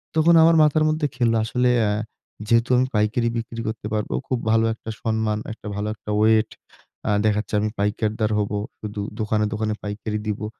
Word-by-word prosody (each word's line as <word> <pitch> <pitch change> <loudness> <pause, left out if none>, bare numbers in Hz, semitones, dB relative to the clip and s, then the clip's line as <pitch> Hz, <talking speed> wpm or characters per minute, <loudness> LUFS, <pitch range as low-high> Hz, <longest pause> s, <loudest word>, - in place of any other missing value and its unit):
তখন 160 +2 +5
আমার 165 +1 +6
মাথার 155 +1 +3
মধ্যে 155 -1 0
খেলল, 120 -2 +2
আসলে 125 +2 +1
অ্যা 105 -2 +2 0.6
যেহেতু 115 +2 +3
আমি 130 +1 +2
পাইকারি 105 +3 +1
বিক্রি 115 0 -5
করতে 110 -1 -4
পারবো, 105 -10 -2
খুব 130 - -1
ভালো 115 0 +3
একটা 115 - -10
সম্মান, 110 -2 0
একটা 110 - -11
ভালো 105 +1 -2
একটা 105 - -12
ওয়েট, 110 0 +4 0.6
আ - - +3
দেখা 105 -1 +3
যাচ্ছে 105 - -5
আমি 110 - 0
পাইকারদার 105 +1 0
হবো। 105 0 -1 0.2
শুধু 105 -1 -5 0.2
দোকানে, 105 0 +1
দোকানে 110 0 -1
পাইকারি 105 +1 -4
দিবো। 105 0 -2
110 Hz, 180 wpm, -23 LUFS, 105-115 Hz, 0.6 s, আমার